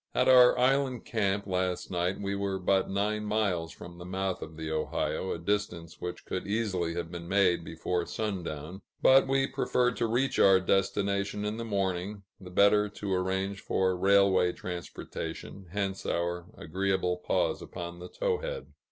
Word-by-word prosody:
At 125 - +3
our 125 -1 +7
island 130 -1 +2
camp, 100 -2 0
last 90 -1 -1
night, 90 +1 -1
we 100 0 -2
were 100 -1 -1
but 95 +1 +1
nine 105 +2 0
miles 100 -6 0
from 85 +1 -11
the - - -7
mouth 95 +1 -2
of 80 0 -8
the 80 -1 -4
Ohio, 80 +4 -1
a - - -2
distance 85 -2 -3
which 90 0 -5
could 95 - -4
easily 95 -6 -1
have 85 -1 -4
been 85 -1 -7
made 90 -3 +3
before 85 +2 -2
sundown; 90 -4 -4 0.2
but 135 +1 +7
we 135 0 +2
preferred 125 -3 +1
to 115 - +1
reach 125 +4 0
our 95 -1 +7
destination 100 +2 0
in 105 +1 -2
the 115 - -4
morning, 100 -1 -2 0.2
the 95 - -10
better 100 +3 +4
to 100 -1 -4
arrange 95 +2 -1
for 95 -1 +1
railway 95 -1 +4
transportation, 90 +1 -7
hence 95 -1 -2
our 85 0 -2
agreeable 95 +1 -1
pause 90 - 0
upon 85 -1 -7
the 90 - -8
Towhead. - - -3
95 Hz, 160 wpm, -29 LUFS, 90-105 Hz, 0.2 s, our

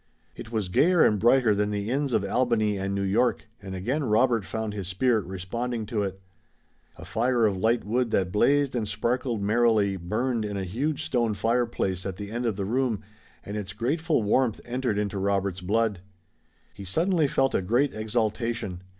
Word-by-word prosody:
It 115 - -9
was 110 -4 -1
gayer 170 - +4
and 105 - +2
brighter 120 0 +4
than 105 0 0
the 105 +2 -2
inns 140 +1 0
of 100 - +1
Albany 110 -1 +1
and 100 0 -2
New 100 - -1
York, 110 +4 +1
and 95 -1 -7
again 125 +11 -1
Robert 115 -1 +2
found 110 0 -4
his 100 -4 -5
spirit 110 +3 +1
responding 110 +6 -4
to 105 0 -2
it. 95 -1 -3 0.8
A 90 - -10
fire 115 +5 +1
of 100 -2 +2
light 110 +5 +1
wood 120 +3 0
that 95 -4 0
blazed 140 +6 +2
and 110 -3 -1
sparkled 115 +2 -1
merrily 105 -2 +2
burned 110 +7 -1
in 105 -1 -3
a 95 - -2
huge 135 - -2
stone 115 -4 0
fireplace 115 -4 0
at 95 -2 -4
the 100 0 -7
end 120 +1 -2
of 110 - 0
the 100 -1 -3
room, 115 -1 0 0.4
and 100 - -6
its 100 -2 -4
grateful 145 +6 0
warmth 115 +2 +1
entered 120 -3 -1
into 100 -1 -2
Robert's 100 -1 -1
blood. 105 +1 0 0.7
He 100 - -9
suddenly 160 - +1
felt 135 0 +1
a - - +1
great 120 +9 +1
exaltation. 110 -3 -2
110 Hz, 185 wpm, -26 LUFS, 100-125 Hz, 0.8 s, gayer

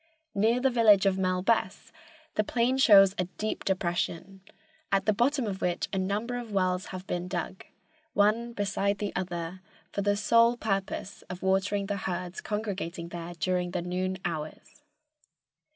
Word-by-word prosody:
Near 225 +4 +2
the 265 +1 +2
village 215 -5 +5
of 195 -1 +3
Melbess 185 +4 0 0.4
the 215 - +1
plain 245 +4 +1
shows 195 -6 +7
a 180 - +2
deep 215 0 -3
depression, 185 0 -2 0.5
at 195 0 +2
the 215 - +3
bottom 255 +4 +1
of 195 -2 -4
which 175 -1 0
a 195 - +1
number 210 +6 -1
of 235 -3 -8
wells 185 -1 0
have 185 0 -7
been 175 -1 -3
dug, 180 +1 -4 0.5
one 220 +4 +2
beside 200 -1 0
the 205 -1 -4
other, 180 -1 -4 0.3
for 200 - -2
the 205 0 +1
sole 230 +3 +4
purpose 195 -2 -3
of 180 0 -7
watering 195 +1 +1
the 200 0 -2
herds 180 -1 -4
congregating 190 -6 -4
there 175 0 -7
during 180 +1 0
the 175 -1 -3
noon 185 +1 -2
hours. 160 - -5
195 Hz, 155 wpm, -28 LUFS, 180-215 Hz, 0.5 s, shows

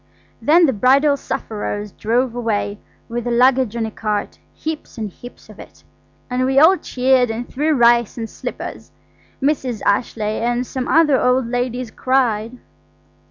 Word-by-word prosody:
Then 330 +4 +5
the 270 - +1
Bridal 275 +6 +4
Sufferers 210 -5 -4
drove 235 +4 0
away, 210 -4 -2 0.3
with 240 0 -4
the - - -1
luggage 250 -1 +3
on 230 -1 -1
a 220 - -5
cart–heaps 220 +9 -5
and 215 -3 -4
heaps 245 +6 -13
of - - -15
it, - - -14 0.4
and 250 0 -1
we 265 +1 0
all 320 +7 +7
cheered 255 -6 +1
and 230 +2 -4
threw 300 +3 0
rice 235 -2 +3
and 225 -1 -4
slippers. - - -7 0.5
Mrs. 265 -6 -1
Ashleigh 215 0 0
and 240 +1 0
some 255 0 -4
other 305 -4 +4
old 250 0 +2
ladies 245 0 -3
cried. 245 -3 0
245 Hz, 150 wpm, -19 LUFS, 225-265 Hz, 0.5 s, all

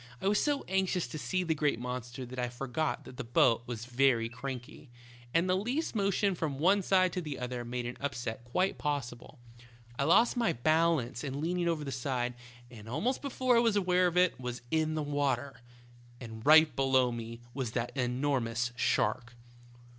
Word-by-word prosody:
I - - -2
was 205 +1 +3
so 290 -2 0
anxious 190 -2 0
to 155 - -6
see 180 +8 -1
the 165 -2 +1
great 150 -4 +1
monster 125 +1 -5
that 125 +1 -8
I 125 0 -1
forgot 135 +5 -3
that 125 - -11
the 130 - -4
boat 120 -1 +3
was 120 -1 -5
very 120 -2 +2
cranky, 125 +2 -7 0.4
and 170 +6 +2
the 185 - +2
least 245 - -1
motion 200 -1 +1
from 155 -5 -3
one 190 +7 +4
side 185 -1 +3
to 180 - -2
the 150 -4 -5
other 125 -1 -4
made 120 0 -4
an 120 - -5
upset 120 -4 -4
quite 180 +11 -1
possible. 135 -5 -4 0.6
I 140 - +2
lost 235 +10 +4
my 240 -2 +1
balance 155 -1 +1
in 140 -1 -4
leaning 175 +2 -1
over 165 -3 0
the 140 - -4
side, 125 -1 -2 0.4
and 110 -2 -11
almost 220 - -1
before 255 -3 +1
I - - +6
was 230 -3 +3
aware 180 -2 +3
of 175 0 -2
it 180 -5 +3
was 125 -1 -5
in 155 0 +1
the 155 - -1
water. 140 -3 -1 0.6
And 110 -2 -9
right 155 -1 +7
below 130 -2 +3
me 115 0 -7
was 125 -5 -3
that 120 +1 -3
enormous 125 -2 0
shark. 120 0 0
135 Hz, 185 wpm, -31 LUFS, 120-175 Hz, 0.6 s, right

